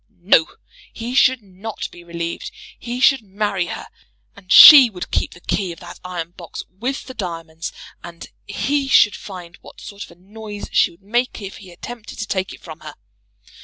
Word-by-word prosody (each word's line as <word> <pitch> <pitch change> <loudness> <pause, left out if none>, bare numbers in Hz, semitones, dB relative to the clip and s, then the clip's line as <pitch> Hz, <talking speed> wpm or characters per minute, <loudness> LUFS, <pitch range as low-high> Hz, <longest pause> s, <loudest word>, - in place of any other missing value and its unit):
No! 165 -4 +4 0.4
he 235 +2 -6
should 260 -2 +3
not 200 +3 -7
be 175 - -14
relieved. 170 0 -5 0.3
He 240 +1 -5
should 270 0 +4
marry 200 -3 -2
her. - - -6 0.5
And 195 -2 -14
she 275 -5 +11
would 180 -4 -8
keep - - -1
the 175 - -16
key 190 0 -2
of 165 - -10
that - - -11
iron 175 -2 -5
box 170 -2 -9 0.2
with 265 +4 -3
the 260 - -9
diamonds, 165 -6 -6 0.3
and 170 -1 -10 0.2
he 275 +7 -1
should 210 -6 +5
find 180 -4 -10
what - - -15
sort 200 0 -9
of - - -20
a - - -16
noise 205 +3 -9
she - - +3
would 170 +3 -21
make 240 +5 -1
if 195 -2 -8
he 190 - -13
attempted 230 +5 -10
to 220 - -4
take 190 -1 -2
it - - -12
from 160 -2 -10
her. - - -10
200 Hz, 190 wpm, -20 LUFS, 175-230 Hz, 0.5 s, she